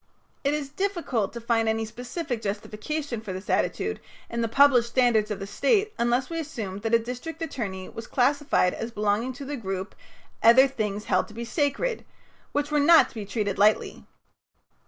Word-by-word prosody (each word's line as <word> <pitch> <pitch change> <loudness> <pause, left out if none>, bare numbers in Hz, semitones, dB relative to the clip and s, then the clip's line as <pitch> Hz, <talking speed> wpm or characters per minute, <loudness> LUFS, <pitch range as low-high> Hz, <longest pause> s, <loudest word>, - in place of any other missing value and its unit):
It 285 +1 +2
is 290 -2 -4
difficult 335 - -1
to 235 - -5
find 230 -1 +1
any 220 0 0
specific 245 +2 -5
justification 220 +6 -4
for 200 -4 -6
this 190 +2 -5
attitude - - 0 0.3
in 235 0 -2
the 230 - +1
published 245 -1 +5
standards 235 -4 +3
of 210 - -2
the 195 - -6
State 425 - +1
unless 240 +2 +1
we 330 0 -4
assume 225 -11 -5
that 225 +2 +1
a - - +7
district 250 +8 -6
attorney 195 -11 -4
was 225 - -9
classified 275 - +2
as 230 - -4
belonging 215 +2 0
to 280 +2 -8
the 290 +2 -4
group 190 -3 -4 0.5
"other 255 +4 +7
things 210 -5 -3
held - - +1
to 215 - -14
be 235 +1 -5
sacred" 290 - -1 0.5
which 290 +1 -1
were 300 - +3
not 325 +3 +6
to - - -18
be 215 -4 -6
treated 205 -2 -2
lightly. 210 +2 +2
235 Hz, 180 wpm, -26 LUFS, 215-285 Hz, 0.5 s, a